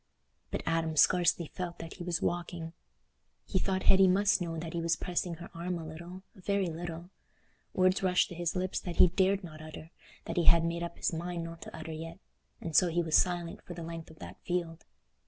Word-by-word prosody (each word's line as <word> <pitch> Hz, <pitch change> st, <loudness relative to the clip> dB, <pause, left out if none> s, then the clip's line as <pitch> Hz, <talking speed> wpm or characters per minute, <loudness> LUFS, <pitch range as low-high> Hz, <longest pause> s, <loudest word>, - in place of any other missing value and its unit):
But -, -, -3 dB
Adam 165 Hz, -1 st, 0 dB
scarcely 175 Hz, +1 st, +4 dB
felt 175 Hz, +2 st, -5 dB
that 165 Hz, 0 st, -7 dB
he 175 Hz, -, -6 dB
was 170 Hz, -2 st, -1 dB
walking. 170 Hz, -1 st, -2 dB, 0.7 s
He 190 Hz, -, 0 dB
thought 190 Hz, 0 st, 0 dB
Hetty 190 Hz, 0 st, +6 dB
must 200 Hz, +2 st, +4 dB
know 165 Hz, -2 st, -2 dB
that 160 Hz, 0 st, -5 dB
he 170 Hz, -, -1 dB
was 165 Hz, 0 st, +2 dB
pressing 175 Hz, 0 st, -2 dB
her 170 Hz, +1 st, -10 dB
arm 175 Hz, +1 st, -3 dB
a 165 Hz, -, -6 dB
little—a 175 Hz, +4 st, -10 dB
very 195 Hz, -2 st, +1 dB
little. 170 Hz, +2 st, -6 dB, 0.6 s
Words 185 Hz, 0 st, +4 dB
rushed 180 Hz, -1 st, +3 dB
to -, -, -7 dB
his 175 Hz, 0 st, -2 dB
lips 185 Hz, +1 st, -1 dB
that 175 Hz, -2 st, -5 dB
he 180 Hz, -, +7 dB
dared 190 Hz, +2 st, +2 dB
not 155 Hz, -3 st, -9 dB
utter—that 155 Hz, +3 st, -10 dB
he 170 Hz, -, +3 dB
had 170 Hz, -1 st, +6 dB
made 170 Hz, 0 st, -1 dB
up 170 Hz, 0 st, -5 dB
his -, -, 0 dB
mind 170 Hz, +1 st, -3 dB
not 165 Hz, 0 st, -8 dB
to -, -, -9 dB
utter 160 Hz, 0 st, -6 dB
yet—and 165 Hz, 0 st, -9 dB
so 180 Hz, -, +7 dB
he 170 Hz, +1 st, +1 dB
was 160 Hz, -1 st, +1 dB
silent 175 Hz, -2 st, +2 dB
for 175 Hz, -, -9 dB
the 170 Hz, -, -6 dB
length 165 Hz, 0 st, -7 dB
of 160 Hz, -, -14 dB
that -, -, -10 dB
field. 170 Hz, -2 st, -3 dB
170 Hz, 210 wpm, -31 LUFS, 165-180 Hz, 0.7 s, he